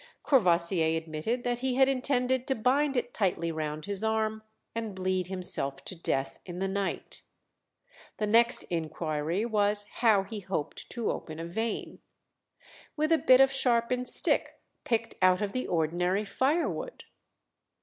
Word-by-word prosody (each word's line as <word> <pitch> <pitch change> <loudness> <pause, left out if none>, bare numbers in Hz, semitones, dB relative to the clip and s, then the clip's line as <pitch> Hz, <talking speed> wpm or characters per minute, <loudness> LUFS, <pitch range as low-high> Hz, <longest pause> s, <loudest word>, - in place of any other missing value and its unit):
Courvoisier 170 - +2
admitted 160 +10 -3
that 245 -1 -1
he 260 0 -1
had 265 0 +5
intended 260 -1 +1
to 265 - +1
bind 270 +4 +1
it 245 0 -2
tightly 175 -5 0
round 155 -1 -4
his 200 +1 -1
arm 220 0 0 0.3
and 225 -3 -4
bleed 185 -1 -1
himself 180 -7 0
to - - -4
death 135 -5 -2
in 175 -1 -8
the 195 +1 -1
night. 195 0 -3 1.0
The 215 - -1
next 230 +3 +4
inquiry 160 +3 -2
was 205 -2 +1
how 220 -5 +4
he 210 +2 -7
hoped 180 -6 -5
to 235 -2 -2
open 155 -1 -7
a 165 - -5
vein. 220 +7 -4 1.0
"With 310 +1 0
a 325 - +5
bit 255 0 +6
of 270 0 +4
sharpened 250 -1 +2
stick - - +3 0.3
picked 230 -1 0
out 185 +2 +4
of 200 - -2
the 255 +3 -3
ordinary 180 +5 0
firewood." 330 - -1
210 Hz, 150 wpm, -29 LUFS, 175-245 Hz, 1.0 s, bit